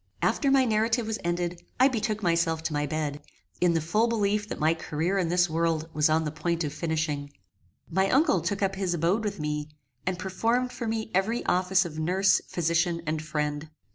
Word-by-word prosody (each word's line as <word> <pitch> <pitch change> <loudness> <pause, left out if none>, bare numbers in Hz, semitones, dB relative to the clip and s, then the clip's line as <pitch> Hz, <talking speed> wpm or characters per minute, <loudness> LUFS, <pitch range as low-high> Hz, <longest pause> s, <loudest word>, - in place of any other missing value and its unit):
After 280 - +2
my 270 -1 +5
narrative 225 +1 +1
was 220 0 -3
ended 175 0 -2 0.2
I 260 - +7
betook 215 -4 -2
myself 170 -2 +1
to 160 -1 -2
my 145 0 0
bed, 150 -1 -3 0.4
in 175 -2 +3
the 165 - +2
full 210 +9 +2
belief 210 -2 0
that - - -4
my 155 +2 +3
career 165 +4 -1
in 175 -3 0
this 175 0 +3
world 160 -1 0
was 150 0 +3
on 160 +1 +2
the 150 - -3
point 170 +2 -1
of 145 - -3
finishing. 155 -3 -2 0.6
My 190 +3 +1
uncle 295 +6 +3
took 200 0 -2
up 195 0 +1
his 190 -2 -1
abode 175 +7 +1
with 210 -5 -3
me, 150 0 -3 0.4
and 185 -1 0
performed 230 +7 0
for 235 - -5
me 220 0 -2
every 205 +6 0
office 185 +1 +2
of 160 -2 -6
nurse, 185 +4 +3
physician 170 0 0
and 155 0 -1
friend. 150 0 -3
175 Hz, 200 wpm, -27 LUFS, 160-210 Hz, 0.6 s, I